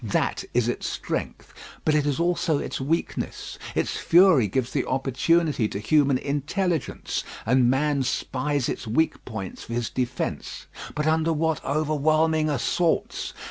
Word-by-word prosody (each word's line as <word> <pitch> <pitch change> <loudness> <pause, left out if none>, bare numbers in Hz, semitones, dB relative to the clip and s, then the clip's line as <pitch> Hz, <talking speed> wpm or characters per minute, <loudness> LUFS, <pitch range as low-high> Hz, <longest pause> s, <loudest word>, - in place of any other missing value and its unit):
That 105 - 0
is 120 -2 +3
its 120 - -2
strength; - - -4 0.3
but 155 - +3
it 150 -1 +2
is 145 0 0
also 170 -2 +1
its - - -4
weakness. 160 +5 -3 0.2
Its - - 0
fury 170 - +5
gives 125 +5 -1
the 140 - 0
opportunity 135 0 +1
to 100 - -5
human 140 +5 +3
intelligence, 155 +4 -2 0.2
and 125 +1 +4
man 140 +2 +2
spies 135 +1 -1
its - - -4
weak 160 +9 +1
points 100 -6 -6
for 115 - -6
his 120 -1 -2
defence; 125 -1 -3 0.3
but 150 - -1
under 160 +1 +2
what 160 0 0
overwhelming 155 +1 +2
assaults! 160 +5 0
145 Hz, 140 wpm, -25 LUFS, 125-160 Hz, 0.3 s, fury